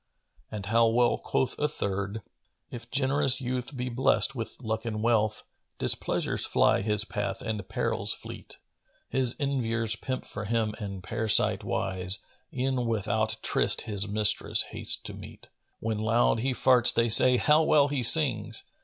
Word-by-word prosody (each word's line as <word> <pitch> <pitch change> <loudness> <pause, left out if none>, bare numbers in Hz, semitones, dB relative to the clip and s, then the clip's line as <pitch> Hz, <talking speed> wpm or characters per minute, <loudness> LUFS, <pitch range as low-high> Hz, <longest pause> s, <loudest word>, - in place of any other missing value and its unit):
And 105 -2 -7
how 115 +2 +3
well 120 +1 +2
quoth 130 - -2
a 150 - +1
third, 100 -5 -4 0.5
"If 120 -1 -8
generous 135 0 +1
youth 125 +1 -5
be 125 0 -3
blessed 130 +2 +2
with 115 -4 -6
luck 110 0 -3
and 110 -2 -4
wealth, 110 -2 +1 0.2
* - - -33
Displeasures - - 0
fly - - +2
his 105 0 +5
path 105 -2 -4
and 110 -4 -5
perils - - -2
fleet: - - -10 0.5
His 130 -2 -1
enviers 115 -6 -1
pimp 130 +4 -5
for 105 +1 -7
him 110 0 -1
and 100 -3 -7
par'site 110 +2 +2
wise 95 0 -1 0.2
* - - -42
E'en 130 -3 -2
without 110 0 -1
tryst - - +1
his 100 -1 -4
mistress 105 +1 +2
hastes - - -1
to - - -8
meet. - - -12 0.3
When 110 -1 -3
loud 115 +1 +1
he 130 +4 -1
farts 125 -1 +3
they 115 - +1
say 125 +3 +6
'How 150 +4 +3
well 150 -2 +3
he 140 -2 -2
sings!' 120 - +3
115 Hz, 160 wpm, -27 LUFS, 105-130 Hz, 0.5 s, say